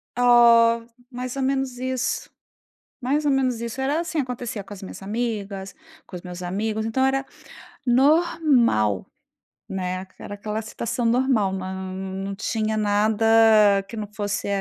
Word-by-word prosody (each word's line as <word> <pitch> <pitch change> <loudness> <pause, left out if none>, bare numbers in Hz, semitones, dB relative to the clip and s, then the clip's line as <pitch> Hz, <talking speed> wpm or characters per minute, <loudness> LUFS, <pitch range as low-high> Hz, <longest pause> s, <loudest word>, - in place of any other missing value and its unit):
Oh, 235 -1 +5 0.3
mais 250 +1 -5
ou 270 - -2
menos 265 -1 -1
isso, 255 0 -2 0.7
mais 285 +4 0
ou 285 - +4
menos 255 -3 +1
isso. 235 +3 -5
Era, 285 +4 +1
assim, 330 -2 -3
acontecia 245 -5 -4
com 200 - -12
as 195 - -12
minhas 190 - -9
amigas, 200 -2 -4 0.3
com 180 - -9
os 175 - -8
meus 180 0 -8
amigos. 215 +4 -2
Então, 260 +4 +1
era 270 0 +1 0.6
normal, 265 - +3 0.6
né, 185 0 -3
era - - -7
aquela 210 +2 -4
situação 230 +2 -3
normal, 230 -5 +2
nã 190 0 -4
nã 190 0 -6 0.3
não 195 0 -4
tinha 220 +1 -1
nada 215 +1 +1 0.6
que 230 - -9
não 215 -2 -4
fosse 205 -1 -3
230 Hz, 150 wpm, -23 LUFS, 200-255 Hz, 0.7 s, Oh